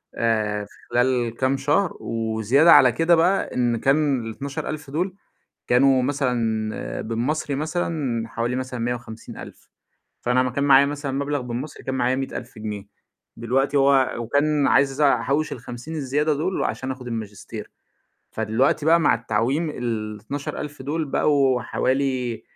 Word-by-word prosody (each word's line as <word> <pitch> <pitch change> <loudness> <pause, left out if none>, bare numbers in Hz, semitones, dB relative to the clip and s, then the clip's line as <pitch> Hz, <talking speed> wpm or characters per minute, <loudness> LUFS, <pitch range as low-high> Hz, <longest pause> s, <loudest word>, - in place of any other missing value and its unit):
آآ 105 -3 0
في - - -20 0.2
خلال 120 -2 +1
كام 135 +1 +1
شهر 150 +7 +1
وزيادة 115 +7 +2
على 130 -2 +7
كده 165 +5 +3
بقى 180 +4 +1
إن 120 -2 +1
كان 135 -2 +1
ال12.000 140 +5 -5
دُول، 180 +6 -2 0.5
كانوا 130 +1 +4
مثلًا 120 -6 -1
بالمصري 130 +6 -2
مثلًا 150 -6 -2
حوالي 115 +2 -2
مثلًا 130 -1 -4
150.000 120 -1 -6 0.5
فأنا 125 +1 +2
امّا 130 -1 -1
كان 140 +3 -1
معايا 140 -1 +6
مثلًا 145 -1 -4
مبلغ 140 +1 -1
بالمصري، 125 +4 -6
كان 130 - -3
معايا 125 0 +1
100.000 125 -3 -6
جنيه، 105 -2 -6 0.5
دلوقتي 135 +5 +1
هو 135 -1 +4
وكان 145 +5 +1
عايز 135 +1 +2
أحوّش 140 +2 +2
ال50 120 +5 -7
الزيادة 150 +1 0
دُول 170 +6 -1
عشان 130 0 -3
آخذ 130 -1 -8
الماجستير، 110 -4 -7 0.6
فدلوقتي 115 +7 +1
بقى 165 +1 +5
مع 145 - +4
التعويم 120 +8 -1
ال12.000 120 +5 -5
دُول 155 +4 -2
بقوا 135 -3 +2
حوالي 130 -1 -1
130 Hz, 135 wpm, -23 LUFS, 115-145 Hz, 0.6 s, على